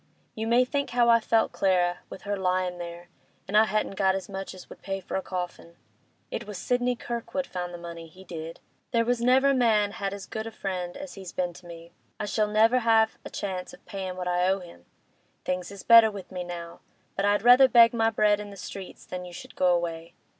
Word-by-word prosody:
You 220 0 -4
may 240 +2 +4
think 280 +2 -2
how 240 -1 +3
I 230 0 +6
felt, 225 0 +2
Clara, 180 -2 +1
with - - -10
her 205 0 -2
lyin' 185 -1 -1
there, 170 0 -8 0.4
and 200 - -3
I 215 +1 +7
hadn't 215 -2 -1
got 190 -1 +3
as 190 -2 -4
much 195 -1 -6
as 185 - -12
would - - -13
pay 195 +1 -3
for - - -6
a 190 - 0
coffin. 180 -2 -6 0.6
It 225 - -5
was 210 -2 -6
Sidney 245 +5 0
Kirkwood 240 +3 -4
found 180 -5 -5
the 175 - -7
money—he 170 +1 -10
did! 165 -2 -7 0.3
There 230 -2 +1
was 245 0 0
never 265 +3 +4
man 220 -5 +3
had 195 -1 -3
as 200 -1 -7
good 220 0 -5
a - - -6
friend 185 -4 -4
as 285 -1 -8
he's 190 -3 -9
been 180 -1 -2
to 175 +1 -14
me; 170 0 -11 0.3
I - - -2
shall 210 +1 +1
never 220 +4 +4
have 225 -2 +3
a - - -7
chance 185 -3 -5
of - - -16
payin' 190 -2 -5
what 180 -1 -4
I 180 0 +2
owe 195 +1 +1
him. 90 - -14 0.6
Things 180 -1 -2
is 200 -1 -10
better 230 -1 +8
with 200 -3 -9
me 180 -1 -4
now, 170 -1 -7 0.4
but 195 - -1
I'd 205 0 +2
rather 250 +2 +8
beg 235 -2 +7
my 225 -1 +2
bread 210 -2 +3
in 205 0 -7
the 200 - -11
streets 195 0 -9
than 180 0 -6
you 180 -1 -10
should - - -10
go 185 - +2
away. 170 -1 -1
195 Hz, 225 wpm, -27 LUFS, 180-225 Hz, 0.6 s, better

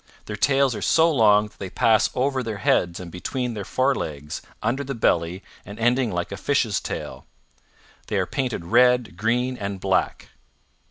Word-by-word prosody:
Their 105 - -5
tails 135 +3 +2
are - - -6
so 165 +1 +4
long 105 -6 +4
that - - -27
they 95 - -5
pass 110 +4 +3
over 130 +1 0
their 115 -4 -4
heads 90 -3 +1
and 90 -2 -8
between 125 +7 -3
their 105 -2 -5
forelegs, 80 - -2 0.2
under 125 +6 0
the 135 0 -5
belly, 90 -3 0 0.2
and 100 +1 -10
ending 120 0 +1
like 85 0 -3
a 100 - -5
fish's 115 -3 0
tail. - - -6 0.8
They - - -1
are - - +1
painted 125 -10 -3
red, 125 0 +3
green, 120 +6 0
and 100 -1 -4
black.' 95 0 -1
115 Hz, 170 wpm, -23 LUFS, 95-130 Hz, 0.8 s, so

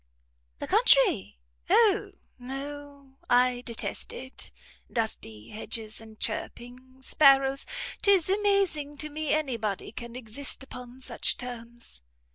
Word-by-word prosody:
"The - - -4
country? - - +4 0.3
O 435 -3 +4 0.3
no! 280 +1 -8
I 245 0 +4
detest 235 -2 0
it! 260 +1 -7 0.4
Dusty 110 - -3
hedges, 220 0 -2
and 220 -1 -14
chirping 255 +2 -5
sparrows! 275 -1 +5 0.3
'Tis 395 -5 +5
amazing 390 -8 +1
to 305 +1 -4
me 310 +1 -3
any 295 -6 +1
body 210 -3 -3
can 235 0 -8
exist 255 +4 -4
upon 250 -1 -10
such - - -1
terms." 235 - -8
260 Hz, 110 wpm, -28 LUFS, 235-290 Hz, 0.4 s, sparrows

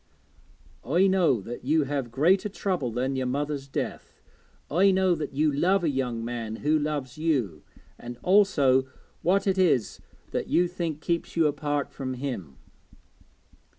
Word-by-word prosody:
'I 170 +10 +3
know 180 - +3
that 120 +5 -8
you 155 +4 +2
have 140 -3 -3
greater 175 - +2
trouble 185 -9 -2
than 130 +4 -1
your 130 -1 -1
mother's 140 +1 -2
death. 135 - -5 0.5
I 185 +6 +4
know 190 -1 +3
that 150 -4 -4
you 150 +1 +2
love 180 +7 +2
a 160 - +2
young 125 -4 -2
man 115 -2 -4
who 155 +1 +3
loves 145 -3 -3
you, 125 - 0 0.4
and 120 0 -8
also 145 -10 +4 0.3
what 195 +3 +2
it 195 -1 +1
is 155 - +2 0.3
that - - -2
you 175 +1 +3
think 170 -4 -4
keeps 170 0 -2
you 165 -1 +3
apart 145 -1 -1
from 130 -2 -5
him.' 120 - -5
145 Hz, 150 wpm, -26 LUFS, 130-175 Hz, 0.5 s, I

